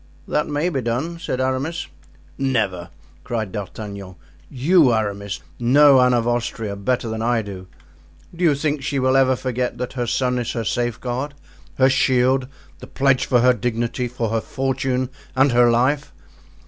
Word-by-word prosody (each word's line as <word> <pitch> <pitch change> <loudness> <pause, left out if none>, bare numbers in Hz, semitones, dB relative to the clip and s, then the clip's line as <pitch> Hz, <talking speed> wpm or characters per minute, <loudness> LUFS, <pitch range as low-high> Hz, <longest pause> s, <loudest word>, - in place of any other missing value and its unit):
"That 150 - 0
may 150 +4 0
be 140 -6 -2
done," 130 +9 -2
said 165 -7 -3
Aramis. 130 +6 -1 0.5
"Never!" 110 -10 -1 0.3
cried 110 -5 -3
D'Artagnan. 100 -1 -7 0.3
"You, 145 +1 +4
Aramis, 100 -6 -2 0.2
know 135 +2 +6
Anne 125 0 +4
of 120 -1 0
Austria 115 -3 -2
better 120 +5 -1
than 110 0 -4
I 115 -1 +1
do. 95 -2 -8 0.7
Do 175 - -4
you 155 -4 +4
think 145 0 -1
she 140 +1 -2
will 130 0 +2
ever 130 -1 +4
forget 125 -1 -3
that 125 0 -4
her 120 -2 -2
son 125 +1 0
is 120 - -3
her 115 - -2
safeguard, 120 +5 -2 0.4
her 130 - +4
shield, 130 0 +2 0.3
the - - -10
pledge 135 -1 +1
for 125 -2 +3
her 125 +1 +5
dignity, 120 +2 -2
for 120 -2 -3
her 115 0 0
fortune 130 0 -2 0.2
and 135 +1 +4
her 120 0 +5
life? 130 +5 +1
125 Hz, 160 wpm, -21 LUFS, 115-135 Hz, 0.7 s, know